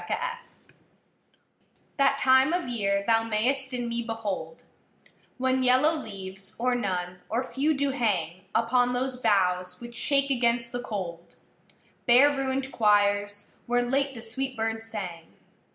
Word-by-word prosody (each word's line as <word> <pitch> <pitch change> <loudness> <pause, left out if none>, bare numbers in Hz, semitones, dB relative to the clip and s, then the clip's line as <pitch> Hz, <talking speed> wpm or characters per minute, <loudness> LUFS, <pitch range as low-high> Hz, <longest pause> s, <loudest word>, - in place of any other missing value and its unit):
LXXIII 480 0 -5 1.3
That 275 -1 +3
time 260 +4 +4
of 355 -4 -1
year 200 -4 0
thou 225 0 +4
mayst 250 +5 0
in 245 -1 -2
me 235 0 -2
behold 205 -8 -5 0.7
When 260 0 +1
yellow 260 +6 +4
leaves, 195 -7 -6
or 250 +2 +1
none, 180 -6 -2
or 235 +4 0
few, 275 +5 0
do 280 0 0
hang 185 -8 -1
Upon 245 +2 +2
those 255 +1 -2
boughs 185 -6 +1
which 240 0 -10
shake 275 +1 +2
against 235 -2 +1
the 245 - -3
cold, 180 -7 -6 0.7
Bare 255 +4 +7
ruinâd 270 -1 -2
choirs, 205 -1 +2 0.2
where 245 0 +2
late 270 +2 0
the 230 - -7
sweet 260 +3 -3
birds 225 0 -2
sang. 180 -7 -6
235 Hz, 135 wpm, -27 LUFS, 205-260 Hz, 1.3 s, Bare